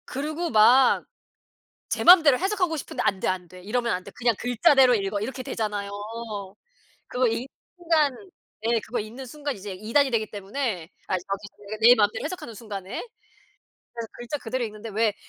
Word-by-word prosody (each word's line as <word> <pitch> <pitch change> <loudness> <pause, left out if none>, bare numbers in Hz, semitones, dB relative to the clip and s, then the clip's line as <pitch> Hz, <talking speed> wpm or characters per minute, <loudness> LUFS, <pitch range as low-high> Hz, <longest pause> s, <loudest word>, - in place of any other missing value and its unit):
그리고 310 +5 -3
막 245 +2 +5 0.8
제 - - -2
맘대로 320 -7 +8
해석하고 375 -3 0
싶은데 280 - -4
'안 195 - +1
돼, - - -1
안 185 -1 -2
돼. 185 +2 -13
이러면 235 +5 -1
안 180 0 -3
돼. - - -11
그냥 240 -1 +2
글자대로 250 +1 +5
읽어.' 200 -1 -1
이렇게 255 +4 -4
되잖아요. 210 -4 -3 1.2
그거 250 0 +1
읽는 230 +2 -1 0.3
순간 325 -6 +2 0.5
네 230 0 +2
그거 230 +3 -4
읽는 235 +5 -8
순간 285 +1 -5
이제 200 0 -7
이단이 230 +9 +1
되기 220 -3 -1
때문에 205 - -3 0.2
아 - - 0
저기 195 +3 -5
그러니까 205 +1 -8
내 235 +2 +8
맘대로 210 +1 +1
해석하는 305 -7 -6
순간에. 200 -3 -6 0.9
그래서 230 -1 -6
글자 240 +5 -5
그대로 250 0 -3
읽는데 215 0 -7
왜 215 0 +1
230 Hz, 360 characters per minute, -25 LUFS, 205-270 Hz, 1.2 s, 맘대로